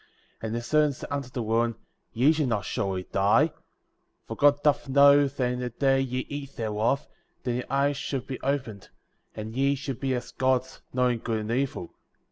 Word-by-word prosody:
* -, -, -36 dB
10. 110 Hz, -, -3 dB
And 110 Hz, -, -3 dB
the 120 Hz, -, -3 dB
serpent 150 Hz, +3 st, +2 dB
said -, -, -9 dB
unto 140 Hz, -3 st, -3 dB
the 125 Hz, -2 st, -4 dB
woman: 115 Hz, +1 st, +1 dB, 0.4 s
Ye 130 Hz, +6 st, +4 dB
shall 155 Hz, -3 st, 0 dB
not 110 Hz, -4 st, -1 dB
surely 95 Hz, -2 st, -2 dB
die; 100 Hz, +8 st, +4 dB
11. -, -, -31 dB, 0.7 s
For -, -, -6 dB
God 145 Hz, 0 st, +4 dB
doth 145 Hz, -2 st, +2 dB
know 140 Hz, +1 st, +6 dB
that 130 Hz, -2 st, -1 dB
in 125 Hz, -, -4 dB
the 125 Hz, 0 st, -2 dB
day 135 Hz, +2 st, +2 dB
ye 130 Hz, -1 st, -2 dB
eat 140 Hz, -1 st, -7 dB
thereof, 110 Hz, +5 st, 0 dB, 0.4 s
then 120 Hz, -1 st, -1 dB
your 125 Hz, -, -4 dB
eyes 140 Hz, +1 st, +1 dB
shall 140 Hz, -2 st, -3 dB
be 130 Hz, +2 st, -7 dB
opened, 130 Hz, -8 st, -3 dB, 0.5 s
and 110 Hz, +1 st, -6 dB
ye 140 Hz, +2 st, +2 dB
shall 140 Hz, 0 st, -4 dB
be 130 Hz, +1 st, -2 dB
as 125 Hz, -, -5 dB
Gods, 130 Hz, 0 st, 0 dB
knowing 125 Hz, -2 st, +1 dB
good 110 Hz, -1 st, -2 dB
and 105 Hz, +1 st, -4 dB
evil. 125 Hz, -8 st, -2 dB
130 Hz, 205 wpm, -27 LUFS, 115-140 Hz, 0.7 s, know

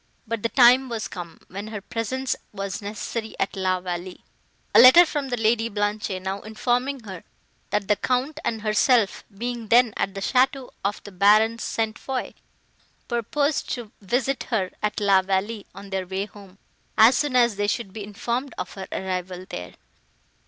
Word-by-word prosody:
But 225 Hz, -1 st, -3 dB
the 230 Hz, -, 0 dB
time 255 Hz, +1 st, +6 dB
was 225 Hz, -2 st, -3 dB
come, 170 Hz, -2 st, -9 dB
when 200 Hz, +3 st, -7 dB
her 215 Hz, -1 st, -5 dB
presence 235 Hz, +6 st, -2 dB, 0.2 s
was 195 Hz, -1 st, -5 dB
necessary 220 Hz, +2 st, -5 dB
at 195 Hz, -, -1 dB
La 185 Hz, -1 st, 0 dB
Vallée, 180 Hz, 0 st, -6 dB, 0.5 s
a -, -, +8 dB
letter 270 Hz, +8 st, +10 dB
from 290 Hz, -4 st, -3 dB
the 245 Hz, -, -1 dB
Lady 225 Hz, +1 st, +2 dB
Blanche 205 Hz, 0 st, -1 dB
now 190 Hz, +1 st, -4 dB
informing 245 Hz, +5 st, -1 dB
her, 190 Hz, -6 st, -9 dB, 0.5 s
that 205 Hz, -1 st, -1 dB
the 210 Hz, -, +4 dB
Count 260 Hz, +7 st, -1 dB
and 225 Hz, -2 st, -2 dB
herself, 215 Hz, 0 st, +2 dB
being 240 Hz, 0 st, -4 dB
then 235 Hz, 0 st, +5 dB
at 195 Hz, -, -2 dB
the -, -, -3 dB
château 260 Hz, +4 st, +1 dB
of 200 Hz, +1 st, -2 dB
the 205 Hz, -, -10 dB
Baron 215 Hz, +4 st, +4 dB
St. 220 Hz, -1 st, -2 dB
Foix, 265 Hz, -1 st, -4 dB, 0.7 s
purposed 280 Hz, +5 st, -1 dB
to 235 Hz, -4 st, -9 dB
visit 250 Hz, +6 st, -1 dB
her 195 Hz, -7 st, -1 dB
at 210 Hz, 0 st, -1 dB
La 200 Hz, -2 st, +4 dB
Vallée, 195 Hz, +3 st, -2 dB
on 195 Hz, 0 st, -10 dB
their 190 Hz, -1 st, -2 dB
way 190 Hz, +2 st, -2 dB
home, 200 Hz, -2 st, -15 dB, 0.4 s
as 225 Hz, +4 st, +7 dB
soon 290 Hz, -2 st, 0 dB
as 240 Hz, -3 st, +4 dB
they 205 Hz, 0 st, 0 dB
should 200 Hz, -2 st, -2 dB
be 215 Hz, -, -6 dB
informed 235 Hz, +5 st, -3 dB
of 185 Hz, -, -5 dB
her 190 Hz, -1 st, -7 dB
arrival 185 Hz, -1 st, -4 dB
there. 90 Hz, 0 st, -7 dB
215 Hz, 175 wpm, -24 LUFS, 195-245 Hz, 0.7 s, letter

